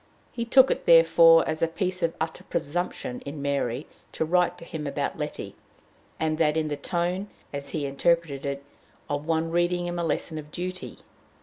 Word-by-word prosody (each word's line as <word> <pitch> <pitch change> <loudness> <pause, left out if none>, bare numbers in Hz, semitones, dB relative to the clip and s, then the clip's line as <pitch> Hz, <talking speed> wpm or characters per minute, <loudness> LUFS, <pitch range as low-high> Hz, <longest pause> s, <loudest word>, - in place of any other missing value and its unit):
He 235 - -3
took 265 +3 +6
it, - - -2
therefore, 165 0 +7
as 155 +1 -2
a 165 - +4
piece 185 +2 -2
of 165 -1 0
utter 160 0 -3
presumption 145 -5 -3
in 145 +1 -7
Mary 140 -2 -1 0.3
to 160 - -1
write 180 +2 +2
to - - -11
him 150 -3 -5
about 140 - -2
Letty, - - -5 0.6
and 155 0 0
that 155 -1 +3
in 155 -1 0
the 145 - -1
tone, 175 +6 -2 0.2
as 140 0 -5
he 150 -3 -2
interpreted 140 0 +1
it, 140 0 -3 0.4
of 145 +1 -3
one 165 0 0
reading 175 +1 +1
him 175 0 -3
a - - 0
lesson 160 0 -2
of 150 0 -10
duty. 185 +3 -6
165 Hz, 185 wpm, -26 LUFS, 145-175 Hz, 0.6 s, therefore